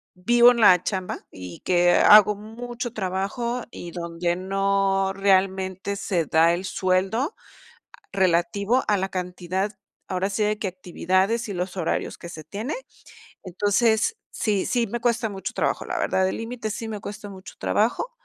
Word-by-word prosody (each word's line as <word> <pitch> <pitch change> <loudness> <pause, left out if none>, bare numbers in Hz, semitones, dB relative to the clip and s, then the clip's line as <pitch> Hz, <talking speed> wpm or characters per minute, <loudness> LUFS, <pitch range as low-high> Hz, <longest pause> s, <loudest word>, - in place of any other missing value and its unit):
vivo 240 +6 +5
en 235 -1 -1
la 180 -5 +7
chamba, 185 -3 -3
y 90 -2 -9
que 175 -1 +3
hago 210 +3 +7
mucho 240 +3 -6
trabajo, 215 +5 -2
y 170 - -8
donde 170 0 -2
no 195 0 +1
realmente 190 0 +1
se 180 -5 -1
da 165 +3 +4
el 180 +2 -3
sueldo, 190 - 0 0.8
relativo 195 +5 +1
a 210 - +4
la 190 - -1
cantidad, 185 +2 -3 0.4
ahora 190 +2 -1
sí, 210 +2 -1
de 210 0 0
qué 210 - -2
actividades 185 +5 -1
y - - -4
los 180 +1 -4
horarios 170 -3 -2
que 170 - -9
se 155 - -9
tiene, 210 - -5 0.7
entonces, 215 - +1 0.2
sí 210 -6 0
sí 240 -2 +1
me 240 +3 -3
cuesta 235 -1 +1
mucho 195 -1 -5
trabajo, - - -1
la - - -2
verdad, 190 - +1
el - - -3
límite 230 -1 -5
sí 220 +2 -5
me 210 -2 -5
cuesta 205 +1 -8
mucho 190 -1 -11
trabajo, 230 - 0
195 Hz, 160 wpm, -24 LUFS, 185-220 Hz, 0.8 s, la